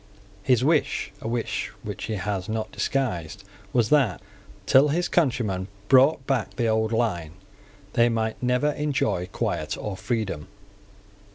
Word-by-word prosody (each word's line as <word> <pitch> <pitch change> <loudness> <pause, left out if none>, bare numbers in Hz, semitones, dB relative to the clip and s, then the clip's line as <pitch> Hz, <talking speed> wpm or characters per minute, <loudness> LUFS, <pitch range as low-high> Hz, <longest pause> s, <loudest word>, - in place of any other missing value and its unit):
His 125 +3 +3
wish, 150 -8 +1
a - - -5
wish 115 0 -2
which - - -5
he 110 - -3
has 95 0 -3
not 110 0 -2
disguised, 100 - -2 0.3
was 120 -3 +2
that, 130 - +3 0.5
till 135 +3 +6
his 175 +4 0
countrymen 115 - 0 0.2
brought 135 +1 +5
back 135 -6 -1
the 120 - 0
old 110 0 +1
line, 90 -9 -1 0.6
they 120 0 +4
might 110 -1 -2
never 125 +4 +2
enjoy 145 -12 -1
quiet - - -2
or 105 -2 -4
freedom. 100 - -3
115 Hz, 135 wpm, -25 LUFS, 105-135 Hz, 0.6 s, till